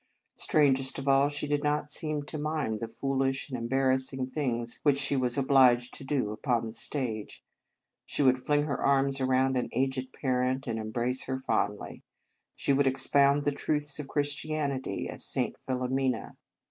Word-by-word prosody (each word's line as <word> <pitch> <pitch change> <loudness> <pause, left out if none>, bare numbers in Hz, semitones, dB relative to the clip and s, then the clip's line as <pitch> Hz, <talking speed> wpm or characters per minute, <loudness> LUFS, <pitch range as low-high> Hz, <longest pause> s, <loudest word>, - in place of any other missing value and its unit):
Strangest 135 -3 +2
of 135 - -6
all, 135 +1 +5
she 145 0 -4
did 145 0 0
not 150 0 0
seem 155 -2 -2
to 155 +1 -6
mind 150 -8 -1
the 115 - -4
foolish 135 +3 -1
and 120 -2 -3
embar 135 0 +3
rassing 130 0 -3
things 120 -5 -2
which 145 -2 +3
she 140 0 -1
was 125 -1 0
obliged 130 -3 +4
to - - -8
do 135 -6 -1
upon 120 +1 0
the 110 - -6
stage. 115 -6 -4 0.6
She - - -1
would 130 -1 +3
fling 145 0 +2
her 140 -3 -2
arms 135 0 +2
around 130 0 +2
an 125 - -1
aged 130 0 -1
parent, 130 0 0
and 115 -2 -2
embrace 120 +4 -2
her 130 0 -4
fondly. 105 0 -1 0.5
She 140 - +1
would 140 0 +3
ex 130 0 0
pound 140 0 +4
the 145 - +2
truths 150 0 -1
of 145 - -5
Christianity, 145 -1 -2
as - - -7
St. - - -1
Philomena. 130 -2 -1
135 Hz, 170 wpm, -29 LUFS, 125-145 Hz, 0.6 s, all